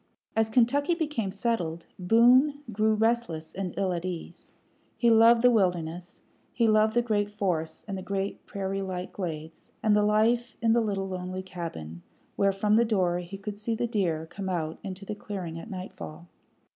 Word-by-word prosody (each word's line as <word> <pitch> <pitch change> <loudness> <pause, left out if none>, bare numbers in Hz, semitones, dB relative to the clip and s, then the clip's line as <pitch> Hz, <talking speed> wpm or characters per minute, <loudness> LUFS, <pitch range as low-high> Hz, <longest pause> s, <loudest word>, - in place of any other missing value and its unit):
As 220 0 +2
Kentucky 275 +8 +3
became 295 - -2
settled, 190 -6 -2
Boone 250 +9 +5
grew 215 +1 +2
restless 215 -8 0
and 190 -2 -3
ill 190 -2 +1
at 170 -1 -3
ease. 180 -2 -7 0.5
He 235 -1 +4
loved 230 +1 +6
the 250 - +7
wilderness; 180 -5 -1 0.3
he 230 -1 +2
loved 215 0 +4
the 240 - +3
great 205 -3 0
forests 180 -6 -2
and 200 - -3
the 190 - -5
great 195 +1 -3
prairie 195 0 -3
like 185 -1 -5
glades, 160 -4 -6
and 215 -1 +4
the 210 - +4
life 220 +3 +2
in 225 0 +3
the 235 - +4
little 200 -3 -1
lonely 185 0 -4
cabin, 160 - -7 0.3
where 200 0 +3
from 210 +2 +2
the 235 - +5
door 185 -6 +1
he 180 +2 -7
could 205 +1 -6
see 225 +2 -1
the 240 +2 -1
deer 180 -9 -1
come 190 +3 -6
out 160 -3 -2
into 195 -1 -7
the 210 - -4
clearing 190 -5 -6
at 220 - -10
nightfall. 180 -3 -8
200 Hz, 180 wpm, -28 LUFS, 180-225 Hz, 0.5 s, the